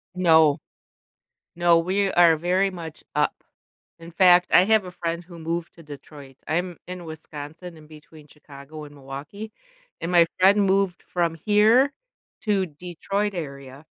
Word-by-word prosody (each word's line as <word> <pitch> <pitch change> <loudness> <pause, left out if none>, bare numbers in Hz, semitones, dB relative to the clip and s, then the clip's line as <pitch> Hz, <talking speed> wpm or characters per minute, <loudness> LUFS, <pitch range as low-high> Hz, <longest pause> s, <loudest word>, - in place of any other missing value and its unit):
No. 160 -5 +4 1.0
No, 175 -1 +4
we 190 +3 0
are 170 -2 +5
very 180 +4 0
much 165 -3 -9
up. 150 0 +1 0.7
In 165 - -11
fact, 180 0 +5
I - - +6
have 215 -1 +2
a 180 - -8
friend 170 0 -4
who 170 -1 -13
moved 165 +1 -4
to 165 - -15
Detroit. 145 -2 -13
I'm 175 +2 -2
in 180 -1 -8
Wisconsin, 160 +2 -10
in 155 - -15
between 155 0 -16
Chicago 145 +1 -13
and 145 0 -14
Milwaukee, 145 +11 -9 0.5
and 170 - -3
my 170 -1 +6
friend 200 +2 +5
moved 195 -2 0
from 170 -2 -2
here 215 - +3 0.5
to 205 -4 0
Detroit 180 +5 -4
area, 140 -3 -8
170 Hz, 145 wpm, -23 LUFS, 155-185 Hz, 1.0 s, I